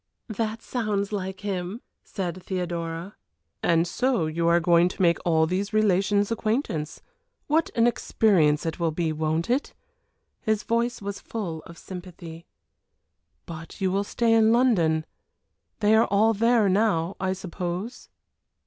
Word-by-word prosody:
"That 220 +1 -3
sounds 210 -5 -2
like 190 -2 -4
him," 195 +1 -3 0.2
said 185 -2 -5
Theodora. 175 0 -4 0.5
"And 165 0 +3
so 245 -2 0
you 165 +2 -1
are 170 0 +5
going 170 +1 +4
to - - -10
make 170 -1 +3
all 160 -2 +3
these 190 +5 -2
relations' 205 0 +2
acquaintance. 215 - -2 0.4
What 315 +2 +1
an 230 -1 +4
experience 180 -10 +2
it 165 +1 -3
will 170 -1 +1
be, 160 0 -1
won't 155 +1 -1
it?" 255 +4 -1 0.7
His 215 -1 0
voice 235 -1 -1
was 200 0 -4
full 175 -8 -5
of 170 - -12
sympathy. 175 -3 -10 1.0
"But 165 -1 -9
you 190 -1 +1
will 200 +2 +1
stay 230 +2 +1
in 225 -1 +5
London. 175 -11 +3 0.8
They 210 +1 +4
are 225 - +4
all 215 +3 +3
there 230 0 +3
now, 190 -3 +1
I 190 0 0
suppose?" 185 +3 -5
190 Hz, 140 wpm, -25 LUFS, 170-220 Hz, 1.0 s, are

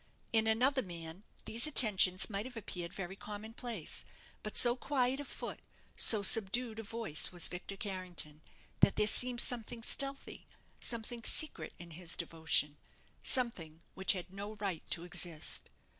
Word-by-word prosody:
In 220 -1 +2
another 255 +5 +2
man 170 0 -9 0.2
these 230 +5 +3
attentions 195 -9 +4
might 205 +2 -4
have 245 -2 -10
appeared 180 -5 -6
very 190 0 -6
common 210 +2 -9
place, 230 -9 -4 0.4
but 215 - -2
so 240 -1 +7
quiet 260 0 0
of 290 - -7
foot, - - -7 0.4
so 215 -3 +7
subdued 225 +3 +4
of 220 -1 -8
voice, 225 -10 0
was 175 -2 +1
Victor 180 +2 -7
Carrington, 180 -6 -6 0.4
that - - +4
there 210 - +2
seemed 245 +3 +4
something 235 -1 -3
stealthy, 275 +3 -1 0.3
something 235 0 -4
secret 310 - 0
in 175 -1 -12
his 165 +1 -4
devotion; 160 -2 0 0.4
something 170 - 0
which 190 +2 +2
had 185 0 -8
no 205 +2 -7
right 195 -6 -4
to 170 - -1
exist. 170 -2 -2
210 Hz, 150 wpm, -33 LUFS, 180-235 Hz, 0.4 s, so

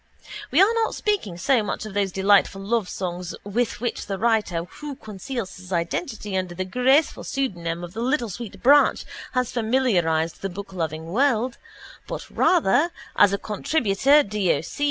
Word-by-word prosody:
We - - +2
are 395 +4 +6
not 455 -1 0
speaking 380 - -1
so 245 +7 +2
much 210 +1 -4
of 215 - -8
those 200 -1 0
delightful 195 +1 +3
lovesongs 185 -5 -2
with 220 +4 -1
which 240 0 -3
the 195 -1 -3
writer 215 -6 +1
who 290 +10 -8
conceals 220 0 -6
his 185 0 -12
identity 195 - -2
under 185 -2 -2
the 185 +1 -3
graceful 260 +9 +2
pseudonym 175 -11 -3
of 175 0 -8
the 225 - -4
Little 245 -1 0
Sweet 230 +2 -8
Branch 285 +3 +5 0.3
has 255 -2 0
familiarised 200 -10 +1
the 195 - -2
bookloving 175 -5 -5
world 240 +5 +1 0.5
but - - -6
rather 330 - +3 0.3
(as 200 - +6
a 200 - 0
contributor 255 +5 +2
D. 205 -5 0
O. - - -1
C. 160 - -9
210 Hz, 160 wpm, -24 LUFS, 185-255 Hz, 0.5 s, are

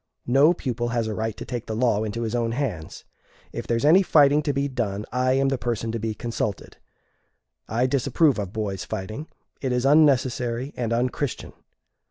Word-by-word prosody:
No 135 +6 +5
pupil 120 -6 -3
has 120 -1 -1
a 110 - -3
right 110 0 -3
to - - -7
take 120 -3 -5
the 110 - -3
law 110 -2 +2
into 110 +2 -3
his 110 0 -3
own 115 -1 0
hands. 110 - -4 0.5
If - - -6
there 115 - +1
is 115 - -1
any 170 +6 +7
fighting 150 -5 +5
to 150 -1 0
be 140 0 0
done, 105 -6 -3
I 130 +1 +1
am 135 0 +2
the 135 -2 -1
person 115 -2 -2
to 115 - -3
be 110 0 -3
consulted. 110 -4 -4 0.9
I 115 +4 +1
disapprove 140 +1 +2
of 100 -3 -4
boys' 100 -3 -3
fighting; 110 +11 -5 0.3
it 130 - -1
is 125 +1 0
unnecessary 130 -3 +2
and 115 -2 -2
unchristian. 125 +3 -2
120 Hz, 190 wpm, -24 LUFS, 110-135 Hz, 0.9 s, any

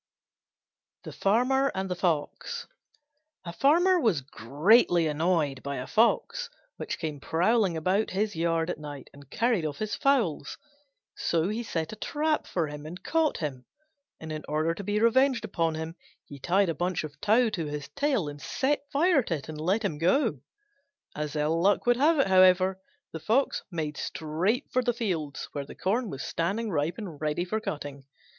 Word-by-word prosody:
THE - - -7
FARMER 255 +7 +2
AND 190 0 -2
THE 180 - -2
FOX 165 -5 -2 0.8
A 170 - -6
Farmer 350 - +4
was 215 - +2
greatly 160 - +3
annoyed 155 -3 0
by 140 0 -4
a 125 - -4
Fox, 360 - +1 0.3
which - - -4
came 155 -3 -4
prowling 180 - +1
about 185 +7 +1
his 205 +2 -1
yard 165 +1 0
at - - -6
night 145 -2 -9
and 140 -1 -15
carried 230 - +1
off 150 -2 -3
his 215 -1 -3
fowls. 225 - +1 0.6
So 170 +2 0
he 220 +3 -2
set 165 -6 -3
a - - -9
trap 305 +7 -1
for 170 -3 -1
him 150 +1 -8
and 175 +3 -9
caught 325 -2 +1
him; 135 -5 -5 0.5
and 160 0 -7
in 155 -1 -5
order 155 +2 +1
to 200 - -7
be 205 +2 0
revenged 235 +1 +3
upon 165 -5 -1
him, 160 +1 -5 0.3
he 140 - -11
tied 185 +6 +2
a - - 0
bunch 175 +3 -1
of 145 -2 -9
tow 225 +2 +3
to 165 -7 -3
his 145 -1 -5
tail 265 - 0
and 145 0 -8
set 285 - -1
fire 315 +1 +4
to 180 -8 -2
it 145 0 -8
and 155 -1 -6
let 195 +7 +1
him 155 -7 -2
go. 180 - +2 0.8
As 150 0 -4
ill 155 +2 +1
luck 200 +2 +3
would 245 0 +4
have 310 +5 +4
it, 275 - +4
however, 185 0 +4 0.3
the 160 - -6
Fox 225 - +1
made 155 -5 -4
straight 175 - -1
for 255 - +2
the 245 -1 0
fields 175 -11 -3
where 145 - -4
the - - -10
corn 225 +4 -1
was 135 -5 -6
standing 200 +7 -2
ripe 155 +1 -1
and 180 -10 -8
ready 155 +3 -1
for 215 +4 -2
cutting. 145 -8 -6
180 Hz, 180 wpm, -28 LUFS, 155-225 Hz, 0.8 s, Farmer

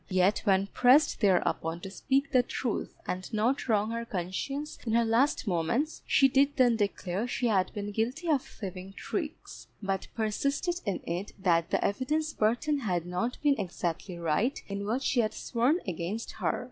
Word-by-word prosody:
Yet 185 +1 +3
when 195 -1 +4
pressed 255 +8 +4
thereupon 170 -4 +2
to 190 - -7
speak 275 +6 0
the 255 - +5
truth 245 -2 -3
and 185 +4 -4
not 235 +5 0
wrong 215 0 +2
her 230 0 -2
conscience 230 - -4
in 225 - -2
her 235 0 +4
last 240 +6 +2
moments, 200 - 0
she 270 - +5
did 275 +2 +2
then 245 -3 +5
declare 200 0 -1
she 245 - -2
had 195 -5 +2
been 205 -1 -4
guilty 245 - -2
of 295 -5 +3
thieving 190 -4 -8
tricks; 310 - -5
but 195 -2 -2
persisted 280 - -1
in 200 - -1
it 175 +4 -4
that 170 -3 +2
the - - +1
evidence 300 +8 0
Burton 245 +7 +1
had 180 -9 -1
not 180 +8 -2
been 285 -2 +3
exactly 175 0 -3
right 170 - 0
in 200 0 -4
what 245 +5 0
she 255 - +1
had 215 -2 +1
sworn 250 +7 +1
against 185 +5 -3
her. - - -1
220 Hz, 170 wpm, -29 LUFS, 190-265 Hz, -, the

